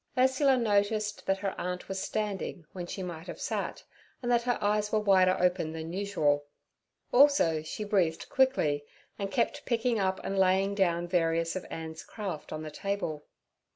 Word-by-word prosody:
Ursula 265 Hz, +1 st, +4 dB
noticed 210 Hz, -2 st, 0 dB
that 195 Hz, 0 st, +2 dB
her 195 Hz, 0 st, -2 dB
aunt 180 Hz, 0 st, -4 dB
was 190 Hz, 0 st, -3 dB
standing 200 Hz, -5 st, -3 dB
when 175 Hz, -2 st, -5 dB
she 190 Hz, -, -5 dB
might 170 Hz, -1 st, -6 dB
have -, -, -7 dB
sat, -, -, -3 dB, 0.4 s
and 240 Hz, -, 0 dB
that 240 Hz, -1 st, +4 dB
her 245 Hz, 0 st, 0 dB
eyes 210 Hz, 0 st, +1 dB
were 220 Hz, -, +3 dB
wider 190 Hz, -3 st, +4 dB
open 180 Hz, -3 st, +1 dB
than 160 Hz, +1 st, -6 dB
usual; 155 Hz, -8 st, +1 dB, 0.7 s
also 245 Hz, -, +5 dB
she 155 Hz, +7 st, -5 dB
breathed 185 Hz, -6 st, +1 dB
quickly 160 Hz, -, +2 dB, 0.4 s
and 200 Hz, -1 st, -2 dB
kept 280 Hz, +7 st, 0 dB
picking 235 Hz, -1 st, +1 dB
up 190 Hz, -1 st, 0 dB
and 195 Hz, 0 st, -1 dB
laying 190 Hz, +1 st, +3 dB
down 175 Hz, -3 st, +1 dB
various 165 Hz, -1 st, +1 dB
of 185 Hz, -, -5 dB
Ann's 160 Hz, 0 st, -6 dB
craft 195 Hz, -8 st, -6 dB
on 155 Hz, 0 st, -4 dB
the 155 Hz, -, -6 dB
table. 165 Hz, -5 st, -3 dB
190 Hz, 170 wpm, -30 LUFS, 165-210 Hz, 0.7 s, also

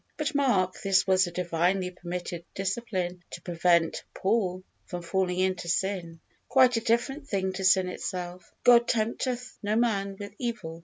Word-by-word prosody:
But 310 Hz, +1 st, -1 dB
mark, 205 Hz, -11 st, +1 dB
this 195 Hz, -1 st, +3 dB
was 190 Hz, -1 st, +3 dB
a -, -, -6 dB
Divinely 180 Hz, +2 st, 0 dB
permitted 175 Hz, -1 st, -6 dB
discipline 190 Hz, -3 st, -2 dB
to -, -, -7 dB
prevent 170 Hz, -1 st, +2 dB
Paul 190 Hz, -3 st, 0 dB, 0.2 s
from 175 Hz, -1 st, -5 dB
falling 180 Hz, 0 st, 0 dB
into 185 Hz, -1 st, 0 dB
sin; 175 Hz, -2 st, -1 dB, 0.3 s
quite 255 Hz, -1 st, +5 dB
a 230 Hz, -, +1 dB
different 255 Hz, +5 st, 0 dB
thing 190 Hz, -4 st, -1 dB
to 190 Hz, +1 st, -5 dB
sin 185 Hz, 0 st, +4 dB
itself. 180 Hz, -1 st, -5 dB
"God 240 Hz, -1 st, +6 dB
tempteth 240 Hz, +2 st, -2 dB
no 210 Hz, 0 st, 0 dB
man 200 Hz, -4 st, +1 dB
with 200 Hz, 0 st, -7 dB
evil." 190 Hz, -10 st, -4 dB
190 Hz, 155 wpm, -28 LUFS, 180-230 Hz, 0.3 s, God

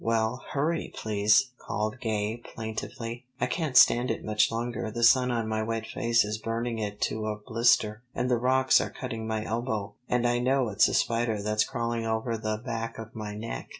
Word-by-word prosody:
"Well, 115 Hz, +2 st, 0 dB
hurry, 155 Hz, +4 st, -1 dB
please!" 110 Hz, +4 st, +3 dB
called 110 Hz, +2 st, -3 dB
Gay 110 Hz, -1 st, -1 dB
plaintively. 115 Hz, +1 st, -6 dB
"I -, -, +2 dB
can't 155 Hz, -7 st, 0 dB
stand 120 Hz, +2 st, +6 dB
it -, -, -3 dB
much 105 Hz, 0 st, +2 dB
longer. 115 Hz, 0 st, -3 dB
The 120 Hz, +2 st, -3 dB
sun 125 Hz, +1 st, +6 dB
on 115 Hz, -2 st, -1 dB
my 110 Hz, 0 st, -1 dB
wet 110 Hz, 0 st, -2 dB
face 115 Hz, -2 st, +2 dB
is 105 Hz, +1 st, -3 dB
burning 115 Hz, +1 st, -2 dB
it 105 Hz, -1 st, -4 dB
to 110 Hz, 0 st, -1 dB
a 105 Hz, -, -1 dB
blister, 110 Hz, -1 st, +2 dB
and 125 Hz, -, 0 dB
the 125 Hz, -1 st, +2 dB
rocks 130 Hz, +2 st, +4 dB
are -, -, -3 dB
cutting 115 Hz, -4 st, -5 dB
my 110 Hz, -1 st, -2 dB
elbow, 110 Hz, -3 st, -2 dB, 0.2 s
and 125 Hz, 0 st, +1 dB
I 120 Hz, 0 st, +1 dB
know 130 Hz, -1 st, +2 dB
it's 105 Hz, 0 st, +4 dB
a -, -, -1 dB
spider 115 Hz, -3 st, +1 dB
that's 105 Hz, 0 st, +2 dB
crawling 115 Hz, -1 st, -2 dB
over 110 Hz, +1 st, -1 dB
the 110 Hz, -1 st, -2 dB
back 115 Hz, 0 st, -4 dB
of 115 Hz, 0 st, -8 dB
my 105 Hz, -1 st, -6 dB
neck." 110 Hz, +2 st, -6 dB
115 Hz, 195 wpm, -28 LUFS, 110-120 Hz, 0.2 s, stand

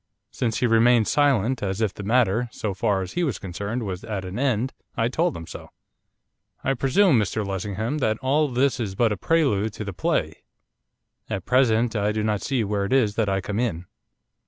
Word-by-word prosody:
Since 115 Hz, -3 st, -2 dB
he -, -, +3 dB
remained 115 Hz, -1 st, +4 dB
silent, 130 Hz, -4 st, +2 dB
as 95 Hz, 0 st, -2 dB
if 110 Hz, -4 st, 0 dB
the -, -, -8 dB
matter, 115 Hz, +1 st, +2 dB
so 105 Hz, -2 st, -3 dB
far 95 Hz, 0 st, 0 dB
as 90 Hz, -, -8 dB
he 175 Hz, -, 0 dB
was 140 Hz, -8 st, -1 dB
concerned, 100 Hz, +6 st, -4 dB
was 95 Hz, -3 st, -5 dB
at 105 Hz, -4 st, -4 dB
an 95 Hz, +5 st, -5 dB
end, 130 Hz, -2 st, 0 dB, 0.2 s
I 115 Hz, +1 st, +1 dB
told 170 Hz, +6 st, 0 dB
him 80 Hz, -, -8 dB
so. -, -, -10 dB, 0.9 s
'I 135 Hz, -, +1 dB
presume, 135 Hz, -, +3 dB
Mr 105 Hz, +1 st, -1 dB
Lessingham, 105 Hz, -, -3 dB
that 110 Hz, -5 st, +1 dB
all 145 Hz, +5 st, +1 dB
this 130 Hz, 0 st, +1 dB
is 100 Hz, -5 st, -3 dB
but 115 Hz, +1 st, +2 dB
a -, -, 0 dB
prelude 110 Hz, -, +1 dB
to 105 Hz, -, -6 dB
the 100 Hz, -, -5 dB
play. 90 Hz, -, -1 dB, 0.9 s
At 95 Hz, -2 st, -3 dB
present 120 Hz, -2 st, +2 dB
I 105 Hz, 0 st, +1 dB
do 110 Hz, 0 st, -1 dB
not 105 Hz, -2 st, 0 dB
see 130 Hz, -4 st, 0 dB
where 100 Hz, -1 st, -1 dB
it 100 Hz, -, -2 dB
is 115 Hz, -6 st, +3 dB
that 110 Hz, -1 st, 0 dB
I 95 Hz, 0 st, 0 dB
come 105 Hz, +3 st, -3 dB
in. 90 Hz, -8 st, -2 dB
110 Hz, 205 wpm, -24 LUFS, 100-125 Hz, 0.9 s, remained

